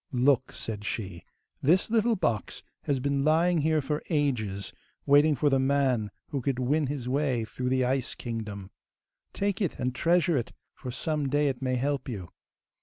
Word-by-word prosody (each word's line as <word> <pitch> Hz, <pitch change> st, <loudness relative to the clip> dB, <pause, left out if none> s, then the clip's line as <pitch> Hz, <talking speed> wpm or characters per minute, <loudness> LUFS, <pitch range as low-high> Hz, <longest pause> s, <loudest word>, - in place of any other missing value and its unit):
'Look!' 130 Hz, 0 st, +2 dB
said 105 Hz, -2 st, -5 dB
she; 95 Hz, -5 st, -4 dB, 0.4 s
'this 180 Hz, +9 st, +3 dB
little 230 Hz, 0 st, +3 dB
box 120 Hz, -, -2 dB, 0.2 s
has 140 Hz, -2 st, +1 dB
been 140 Hz, +1 st, 0 dB
lying 165 Hz, +3 st, +3 dB
here 155 Hz, 0 st, +2 dB
for 150 Hz, +3 st, -2 dB
ages, 115 Hz, -, -1 dB, 0.3 s
waiting 145 Hz, +2 st, +5 dB
for 145 Hz, +3 st, +1 dB
the 135 Hz, -, +3 dB
man 130 Hz, -5 st, +2 dB, 0.2 s
who 140 Hz, -4 st, -2 dB
could 135 Hz, 0 st, -1 dB
win 140 Hz, +4 st, +1 dB
his 135 Hz, -3 st, -4 dB
way 130 Hz, -3 st, 0 dB
through 125 Hz, +3 st, -3 dB
the 130 Hz, 0 st, +2 dB
Ice 130 Hz, 0 st, -1 dB
Kingdom. 105 Hz, -5 st, -6 dB, 0.6 s
Take 200 Hz, +1 st, -1 dB
it, 185 Hz, -, -1 dB
and 125 Hz, 0 st, -1 dB
treasure 170 Hz, +3 st, +2 dB
it, 120 Hz, -, -3 dB, 0.2 s
for 130 Hz, -, -8 dB
some 145 Hz, +3 st, -2 dB
day 145 Hz, +1 st, +2 dB
it 130 Hz, -1 st, -4 dB
may 130 Hz, -1 st, 0 dB
help 140 Hz, +2 st, -1 dB
you. 95 Hz, -8 st, -6 dB
135 Hz, 175 wpm, -28 LUFS, 120-150 Hz, 0.6 s, waiting